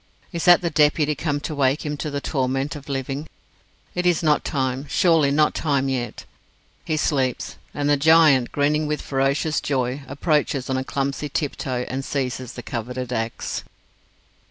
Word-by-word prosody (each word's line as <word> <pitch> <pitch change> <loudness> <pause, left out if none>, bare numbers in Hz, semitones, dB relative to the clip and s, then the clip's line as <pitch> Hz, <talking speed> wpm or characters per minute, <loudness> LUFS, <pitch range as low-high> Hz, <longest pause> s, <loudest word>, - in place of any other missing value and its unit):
Is 170 - -2
that 175 -1 +7
the 170 -2 -1
Deputy 150 0 +3
come 145 0 -2
to 155 - -4
wake 140 +1 +1
him 150 0 -2
to 150 - -3
the 145 -1 -2
torment 135 0 -1
of 145 -1 -10
living? 135 +2 -3 0.7
It 180 0 0
is 175 -1 +2
not 150 -2 +3
time 135 0 -2
surely 165 -5 +4
not 150 +2 +3
time 140 -4 0
yet. 120 -4 -3 0.6
He 155 - -1
sleeps 135 -5 -1
and 145 0 -2
the 145 0 +4
giant, 155 -4 +5
grinning 150 +2 +1
with 150 0 -1
ferocious 140 +3 0
joy, 130 0 -1
approaches 140 -2 0
on 130 0 0
clumsy 140 +2 -2
tiptoe 130 -4 -2
and 135 +1 -3
seizes 130 -3 -3
the 120 - -8
coveted 125 +2 -4
axe. 115 -1 -3
140 Hz, 160 wpm, -23 LUFS, 130-150 Hz, 0.7 s, that